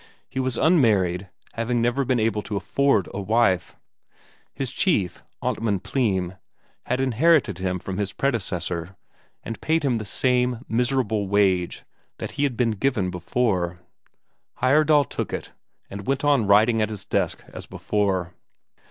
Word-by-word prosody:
He 130 Hz, -, -5 dB
was 130 Hz, -2 st, -1 dB
unmarried, 100 Hz, -, +3 dB, 0.2 s
having 120 Hz, +1 st, -1 dB
never 120 Hz, +4 st, +1 dB
been 130 Hz, -2 st, +1 dB
able 110 Hz, -1 st, +1 dB
to 105 Hz, -, -5 dB
afford 110 Hz, +1 st, +1 dB
a 100 Hz, -, -3 dB
wife. 100 Hz, -3 st, +1 dB, 0.8 s
His 135 Hz, -2 st, -4 dB
chief, 105 Hz, -, 0 dB, 0.2 s
Amtmand 105 Hz, -4 st, -1 dB
Pleym, 95 Hz, -8 st, -1 dB, 0.5 s
had 125 Hz, -, 0 dB
inherited 130 Hz, -, +3 dB
him 95 Hz, -1 st, -1 dB
from 95 Hz, +2 st, -5 dB
his 100 Hz, -1 st, -1 dB
predecessor, 95 Hz, -, -2 dB, 0.5 s
and 115 Hz, -, -6 dB
paid 160 Hz, -1 st, +1 dB
him 125 Hz, -4 st, +2 dB
the 110 Hz, -, -4 dB
same 125 Hz, +2 st, 0 dB
miserable 115 Hz, -3 st, 0 dB
wage 95 Hz, -3 st, +1 dB, 0.3 s
that -, -, -5 dB
had 140 Hz, -4 st, -1 dB
been 120 Hz, -2 st, +2 dB
given 105 Hz, -4 st, 0 dB
before; 90 Hz, -1 st, -1 dB, 0.9 s
Heyerdahl 145 Hz, +1 st, +4 dB
took -, -, -4 dB
it, -, -, -5 dB, 0.4 s
and 100 Hz, 0 st, -8 dB
went 135 Hz, +1 st, 0 dB
on 140 Hz, -7 st, +3 dB
writing 110 Hz, +3 st, +5 dB
at 110 Hz, -, +1 dB
his 105 Hz, -3 st, -7 dB
desk -, -, -1 dB
as -, -, -8 dB
before. 95 Hz, -4 st, -1 dB
110 Hz, 145 wpm, -24 LUFS, 95-130 Hz, 0.9 s, writing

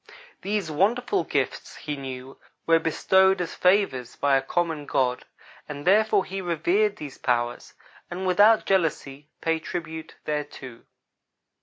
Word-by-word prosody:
These 200 Hz, -4 st, -2 dB
wonderful 240 Hz, -, +1 dB
gifts, -, -, -2 dB
he 150 Hz, -, -5 dB
knew, 130 Hz, -1 st, -8 dB, 0.3 s
were 165 Hz, 0 st, +4 dB
bestowed 190 Hz, +4 st, +3 dB
as 180 Hz, -1 st, -3 dB
favors 180 Hz, -, +1 dB
by 140 Hz, -1 st, +2 dB
a 135 Hz, -, +3 dB
common 160 Hz, 0 st, -2 dB
God, 125 Hz, -1 st, 0 dB, 0.4 s
and 145 Hz, -1 st, -7 dB
therefore 210 Hz, +1 st, +4 dB
he 195 Hz, +1 st, -5 dB
revered 185 Hz, +5 st, +1 dB
these 145 Hz, -7 st, -9 dB
powers, 120 Hz, -1 st, -1 dB, 0.3 s
and, 180 Hz, +2 st, -5 dB
without 205 Hz, +5 st, +5 dB
jealousy, 150 Hz, -6 st, -1 dB
paid 165 Hz, 0 st, 0 dB
tribute 160 Hz, -1 st, -6 dB
thereto. 145 Hz, -5 st, -5 dB
165 Hz, 130 wpm, -25 LUFS, 140-190 Hz, 0.4 s, without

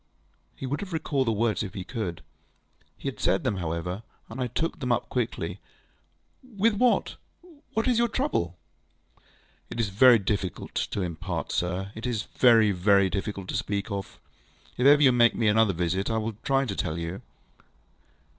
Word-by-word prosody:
ŌĆØ -, -, -28 dB
He -, -, -2 dB
would 140 Hz, +3 st, -2 dB
have 190 Hz, -3 st, -6 dB
recalled 140 Hz, -5 st, 0 dB
the -, -, +3 dB
words 110 Hz, 0 st, 0 dB
if 100 Hz, -, -5 dB
he 95 Hz, -, -4 dB
could. 100 Hz, -6 st, -5 dB, 0.7 s
He -, -, -7 dB
had 135 Hz, -, -4 dB
said -, -, +1 dB
them, 125 Hz, -7 st, 0 dB
however, 85 Hz, +3 st, -3 dB, 0.3 s
and 120 Hz, +4 st, -6 dB
I 125 Hz, -, 0 dB
took 165 Hz, +9 st, -2 dB
them 125 Hz, -3 st, -2 dB
up 120 Hz, 0 st, 0 dB
quickly. 125 Hz, -3 st, -2 dB, 1.0 s
ŌĆ£With 220 Hz, +3 st, +3 dB
what? 250 Hz, -1 st, +2 dB, 0.6 s
What 225 Hz, +3 st, +1 dB
is 245 Hz, -2 st, +3 dB
your 235 Hz, -, +3 dB
trouble? 210 Hz, -, -1 dB, 1.1 s
ŌĆØ -, -, -7 dB
ŌĆ£It -, -, -5 dB
is 110 Hz, -3 st, +1 dB
very 120 Hz, +5 st, +7 dB
difficult 100 Hz, -3 st, -3 dB
to 100 Hz, -, -2 dB
impart, 85 Hz, -3 st, -4 dB
sir. 90 Hz, +2 st, -2 dB
It 110 Hz, +3 st, -5 dB
is 115 Hz, -4 st, -1 dB
very, 115 Hz, -4 st, +4 dB
very 100 Hz, 0 st, +3 dB
difficult 100 Hz, -1 st, -4 dB
to -, -, -3 dB
speak 100 Hz, +1 st, -2 dB
of. 100 Hz, -1 st, -5 dB, 0.6 s
If 125 Hz, -, +3 dB
ever 145 Hz, +1 st, +7 dB
you 135 Hz, -, +7 dB
make 120 Hz, -1 st, +4 dB
me 115 Hz, -, +1 dB
another 110 Hz, 0 st, +4 dB
visit, 90 Hz, +2 st, -1 dB
I 115 Hz, -, 0 dB
will 110 Hz, +1 st, -2 dB
try 135 Hz, 0 st, +1 dB
to 100 Hz, -6 st, -4 dB
tell 80 Hz, -3 st, -2 dB
you. 85 Hz, +3 st, -5 dB
110 Hz, 185 wpm, -27 LUFS, 95-130 Hz, 1.1 s, very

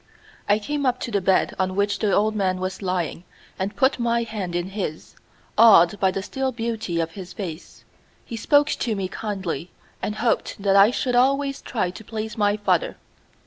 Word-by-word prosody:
I 205 Hz, -, +5 dB
came 285 Hz, +7 st, -3 dB
up 250 Hz, 0 st, +1 dB
to 235 Hz, -, -4 dB
the 200 Hz, -2 st, +1 dB
bed 190 Hz, +1 st, +2 dB
on 185 Hz, 0 st, 0 dB
which 200 Hz, 0 st, 0 dB
the 210 Hz, -2 st, +1 dB
old 215 Hz, +2 st, +2 dB
man 185 Hz, -3 st, 0 dB
was 185 Hz, +1 st, -4 dB
lying 180 Hz, -3 st, -2 dB, 0.4 s
and 195 Hz, +2 st, -2 dB
put 265 Hz, -1 st, +2 dB
my 235 Hz, 0 st, +1 dB
hand 205 Hz, -6 st, -5 dB
in 175 Hz, +1 st, -2 dB
his, 190 Hz, -6 st, -5 dB, 0.4 s
awed 205 Hz, -4 st, +7 dB
by 190 Hz, -, +3 dB
the 190 Hz, +1 st, -3 dB
still 265 Hz, +4 st, -2 dB
beauty 225 Hz, -7 st, -3 dB
of 165 Hz, 0 st, -1 dB
his 185 Hz, 0 st, -9 dB
face. 175 Hz, -5 st, -8 dB, 0.4 s
He 230 Hz, -, -6 dB
spoke 290 Hz, +6 st, +3 dB
to 225 Hz, -3 st, -1 dB
me 195 Hz, -2 st, -2 dB
kindly, 190 Hz, -4 st, -4 dB, 0.3 s
and 210 Hz, -, -2 dB
hoped 230 Hz, -1 st, -1 dB
that 195 Hz, -1 st, +3 dB
I 200 Hz, +2 st, +7 dB
should 250 Hz, 0 st, -1 dB
always 275 Hz, +2 st, +2 dB
try 210 Hz, -7 st, -2 dB
to 205 Hz, -, -11 dB
please 220 Hz, 0 st, -5 dB
my 205 Hz, -1 st, +2 dB
father. -, -, 0 dB
205 Hz, 190 wpm, -23 LUFS, 185-230 Hz, 0.4 s, awed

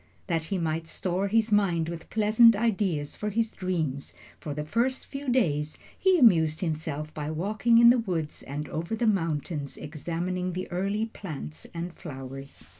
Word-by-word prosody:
That 165 Hz, -3 st, -1 dB
he 195 Hz, +4 st, -2 dB
might 160 Hz, -1 st, -2 dB
store 185 Hz, +4 st, -1 dB
his 220 Hz, +2 st, +2 dB
mind 180 Hz, -6 st, +2 dB
with 170 Hz, -1 st, -7 dB
pleasant 220 Hz, +1 st, +6 dB
ideas 195 Hz, -9 st, 0 dB
for 210 Hz, -, -3 dB
his 225 Hz, +2 st, 0 dB
dreams, 160 Hz, -7 st, -3 dB, 0.2 s
for 150 Hz, -, -6 dB
the 150 Hz, 0 st, -3 dB
first 240 Hz, +10 st, 0 dB
few 275 Hz, -1 st, -5 dB
days 155 Hz, -, +1 dB, 0.2 s
he 375 Hz, -1 st, +3 dB
amused 165 Hz, -, +5 dB
himself 155 Hz, -2 st, -3 dB
by 150 Hz, -1 st, -4 dB
walking 210 Hz, +8 st, +2 dB
in 235 Hz, 0 st, +9 dB
the 245 Hz, -, +3 dB
woods 170 Hz, -9 st, -3 dB
and 145 Hz, +2 st, -5 dB
over 170 Hz, +7 st, -3 dB
the 235 Hz, -, 0 dB
mountains, 165 Hz, -7 st, -1 dB
examining 175 Hz, +4 st, -3 dB
the 185 Hz, +1 st, -4 dB
early 200 Hz, +5 st, 0 dB
plants 140 Hz, -, -8 dB
and 170 Hz, +1 st, -5 dB
flowers. 135 Hz, -4 st, -9 dB
175 Hz, 165 wpm, -27 LUFS, 155-215 Hz, 0.2 s, in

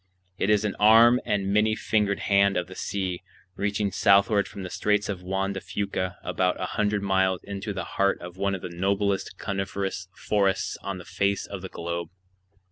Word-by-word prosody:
It 95 Hz, -, +1 dB
is 105 Hz, 0 st, +3 dB
an 105 Hz, -, -1 dB
arm 115 Hz, +4 st, +7 dB
and 100 Hz, -1 st, 0 dB
many 110 Hz, +1 st, +3 dB
fingered 105 Hz, -2 st, 0 dB
hand 100 Hz, -1 st, +3 dB
of 90 Hz, -, 0 dB
the 95 Hz, -, -11 dB
sea, 95 Hz, -2 st, -3 dB, 0.3 s
reaching 100 Hz, 0 st, -1 dB
southward 100 Hz, +2 st, +4 dB
from 100 Hz, -, -8 dB
the 90 Hz, -, -6 dB
Straits 105 Hz, 0 st, +1 dB
of 95 Hz, -3 st, -3 dB
Juan 95 Hz, +2 st, -1 dB
de 95 Hz, -, -5 dB
Fuca 100 Hz, -2 st, -3 dB
about 90 Hz, -1 st, 0 dB
a -, -, -1 dB
hundred 105 Hz, -1 st, 0 dB
miles 95 Hz, -1 st, +1 dB
into 100 Hz, +1 st, -5 dB
the 95 Hz, -, -4 dB
heart 100 Hz, 0 st, 0 dB
of 90 Hz, 0 st, -9 dB
one 100 Hz, +1 st, 0 dB
of 95 Hz, -, -8 dB
the 90 Hz, -, -4 dB
noblest 100 Hz, +3 st, -1 dB
coniferous 95 Hz, -1 st, -3 dB
forests 95 Hz, -3 st, 0 dB
on 100 Hz, -1 st, -4 dB
the 90 Hz, -, -10 dB
face 100 Hz, 0 st, 0 dB
of 100 Hz, -2 st, -7 dB
the 95 Hz, -, -7 dB
globe. 85 Hz, 0 st, -4 dB
100 Hz, 190 wpm, -26 LUFS, 95-100 Hz, 0.3 s, arm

